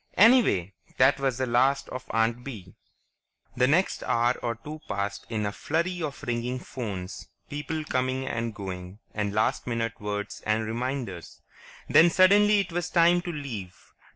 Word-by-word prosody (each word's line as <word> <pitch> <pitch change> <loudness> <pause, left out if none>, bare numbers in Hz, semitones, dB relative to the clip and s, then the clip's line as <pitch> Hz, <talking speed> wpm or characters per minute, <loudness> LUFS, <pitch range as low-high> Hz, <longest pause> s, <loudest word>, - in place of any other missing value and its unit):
Anyway, 205 - +5 0.2
that 135 +2 +5
was 135 -3 0
the 130 - 0
last 130 +3 +2
of 130 - -6
Aunt 115 +2 +1
Bee! 100 -9 -9 0.8
The 125 +1 +3
next 175 +7 +2
hour 120 +1 +2
or 120 -1 -2
two 150 +7 -9
passed 100 0 -3
in 110 -2 -1
a 100 - -1
flurry 170 - -2
of 150 -3 -5
ringing 120 +1 -2
phones, 100 -8 -6 0.2
people 150 +2 -3
coming 130 -1 -1
and 115 -3 -3
going, 95 -1 -7 0.2
and 105 -1 -1
last 110 +4 0
minute 115 -1 -2
words 105 0 -4
and 110 +1 0
reminders. 115 -5 -4 0.4
Then 160 +3 +7
suddenly 200 +4 +5
it 190 - -6
was 175 +1 -2
time 175 0 +4
to 175 - -4
leave. 120 - -6
125 Hz, 155 wpm, -27 LUFS, 110-150 Hz, 0.8 s, Then